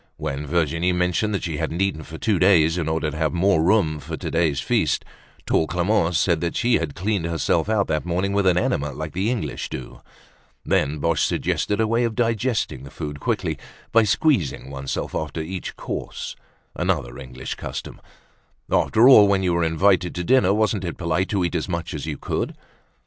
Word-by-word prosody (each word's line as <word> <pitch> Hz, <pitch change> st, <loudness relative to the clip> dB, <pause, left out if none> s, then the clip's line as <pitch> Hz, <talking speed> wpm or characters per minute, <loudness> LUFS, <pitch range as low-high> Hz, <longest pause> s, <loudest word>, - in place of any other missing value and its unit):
When 70 Hz, +2 st, -4 dB
Virginie 85 Hz, +2 st, +1 dB
mentioned 90 Hz, +4 st, 0 dB
that -, -, -3 dB
she 80 Hz, -3 st, -3 dB
hadn't 80 Hz, +2 st, -3 dB
eaten 95 Hz, -5 st, 0 dB
for 80 Hz, +2 st, -9 dB
two 105 Hz, -1 st, +1 dB
days 85 Hz, -3 st, +5 dB
in 85 Hz, -3 st, -1 dB
order 80 Hz, -1 st, -1 dB
to 80 Hz, -, -7 dB
have 80 Hz, -1 st, 0 dB
more 90 Hz, -1 st, +3 dB
room 85 Hz, -4 st, +2 dB
for -, -, -6 dB
today's 80 Hz, -4 st, 0 dB
feast, -, -, 0 dB, 0.4 s
tall 80 Hz, -, +2 dB
Clemence 90 Hz, -1 st, +1 dB
said 85 Hz, -2 st, +2 dB
that 85 Hz, 0 st, -2 dB
she 120 Hz, 0 st, +2 dB
had 80 Hz, -4 st, -4 dB
cleaned 100 Hz, -2 st, -1 dB
herself 85 Hz, +4 st, 0 dB
out 105 Hz, -3 st, +2 dB
that 75 Hz, -1 st, -1 dB
morning 90 Hz, +3 st, -1 dB
with 100 Hz, -1 st, +2 dB
an 90 Hz, -1 st, +4 dB
enema 75 Hz, -4 st, 0 dB
like 80 Hz, +3 st, -6 dB
the 95 Hz, +5 st, 0 dB
English 105 Hz, -, -3 dB
do. 65 Hz, -, -8 dB, 0.6 s
Then 75 Hz, +3 st, +1 dB
Boche 80 Hz, -1 st, 0 dB
suggested 105 Hz, -, 0 dB
a 110 Hz, -, +3 dB
way 115 Hz, +2 st, +1 dB
of 115 Hz, -2 st, -1 dB
digesting 115 Hz, -, 0 dB
the 70 Hz, -, -10 dB
food 75 Hz, 0 st, -6 dB
quickly -, -, -2 dB, 0.3 s
by 115 Hz, -, +6 dB
squeezing 105 Hz, -, +1 dB
oneself 70 Hz, -1 st, -4 dB
after 80 Hz, 0 st, -3 dB
each 90 Hz, +3 st, -5 dB
course, -, -, -5 dB, 0.4 s
another -, -, -1 dB
English 65 Hz, -1 st, -6 dB
custom. -, -, -7 dB, 0.7 s
After 115 Hz, +3 st, +4 dB
all, 110 Hz, -6 st, +9 dB
when 100 Hz, -1 st, +2 dB
you 90 Hz, -2 st, +1 dB
were 85 Hz, 0 st, +1 dB
invited 90 Hz, +2 st, +2 dB
to 90 Hz, -, -2 dB
dinner, 100 Hz, -2 st, +4 dB
wasn't 105 Hz, -1 st, +1 dB
it 85 Hz, -, -4 dB
polite 85 Hz, +2 st, -1 dB
to 95 Hz, -4 st, +1 dB
eat 85 Hz, -, -2 dB
as 85 Hz, +2 st, -2 dB
much 85 Hz, -1 st, -3 dB
as 75 Hz, 0 st, -5 dB
you 75 Hz, -3 st, -3 dB
could? -, -, -3 dB
85 Hz, 190 wpm, -23 LUFS, 80-100 Hz, 0.7 s, all